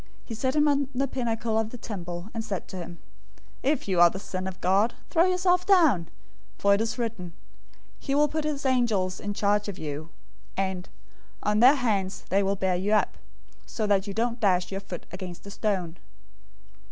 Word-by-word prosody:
He 230 - -6
set 260 +5 -1
him 300 0 +4
on 280 -2 +2
the 275 +2 +1
pinnacle 230 -3 -1
of 220 -1 -1
the 245 - -8
temple, 175 -6 -6
004:006 - - -24
and 225 -1 -3
said 200 -4 -4
to 190 - -7
him, 175 -1 -7 0.6
"If 285 -2 0
you 185 -3 +1
are 175 0 +8
the 185 - -6
Son 185 -1 -4
of 190 -1 -7
God, 195 +6 +2 0.2
throw 335 0 +5
yourself 360 -1 +2
down, 315 - +4 0.5
for 200 0 +4
it 200 - +2
is 225 +2 -2
written, 220 -8 -4 0.7
'He 275 - -2
will 295 +1 +5
give 310 +1 -2
his 295 -2 -3
angels 225 -8 +1
charge 205 0 +2
concerning 195 -5 -6
you.' 155 +3 -7 0.5
and, 190 -1 -2 0.5
'On 210 0 +2
their 255 +5 +8
hands 205 -8 -1
they 195 +1 +3
will 195 0 +1
bear 190 -1 +1
you 195 +4 0
up, 215 - +2 0.5
so 220 - -2
that 200 -1 +2
you 200 - -5
don't 235 +1 0
dash 185 -4 +2
your 195 0 -3
foot 180 -3 -8
against 185 -1 -8
a 200 - -8
stone.'" 185 -6 -2
210 Hz, 195 wpm, -27 LUFS, 185-250 Hz, 0.7 s, are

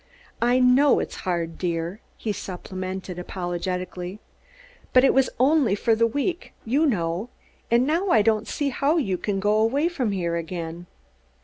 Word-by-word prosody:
I 240 +2 +3
know 255 +3 +5
it's - - -4
hard, 165 -2 -2
dear," 170 +3 -2 0.2
he 215 - -2
supplemented 185 -1 -6
apologetically, 180 +1 -4 0.7
"but 255 - +6
it 270 - +5
was 265 0 +3
only 270 -5 +4
for 225 +2 +2
the 230 +1 +3
week, 290 +9 -3
you 280 +8 +2
know; 180 - -1 0.4
and 235 +2 +4
now 335 +7 +1
I 220 -10 +5
don't 220 0 +1
see 285 +4 -1
how 280 +5 +1
you 195 - 0
can 200 -2 -1
go 205 +2 +2
away 275 +9 +2
from 260 -11 -1
here 170 -3 -1
again." 170 0 -5
210 Hz, 155 wpm, -24 LUFS, 180-260 Hz, 0.7 s, but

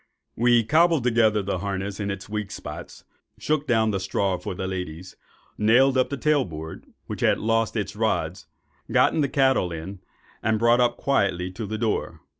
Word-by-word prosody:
We 120 0 +4
cobbled 160 +3 +3
the 110 -5 +2
harness 100 0 -3
in 100 -1 -2
its 100 -1 -5
weak 105 -1 -4
spots, - - -9 0.3
shook 150 -1 -1
down 110 -3 +2
the 100 - -1
straw 95 0 0
for 90 - -5
the 95 - -4
ladies, 90 -1 -6 0.4
nailed 125 +5 +4
up 130 -1 +2
the 140 - -3
tail 150 -1 +2
board, 80 -2 -8 0.2
which - - -6
had - - +3
lost 115 +1 0
its 100 -1 -3
rods, 110 +1 -1 0.4
got - - +4
the 145 -3 +1
cattle 135 - +2
in, 85 +4 -7 0.4
and 110 0 +1
brought 120 +2 +4
up 120 -1 +2
quietly 95 -9 0
to 100 +3 -6
the 110 +2 -3
door. 110 -1 -2
110 Hz, 175 wpm, -24 LUFS, 95-120 Hz, 0.4 s, We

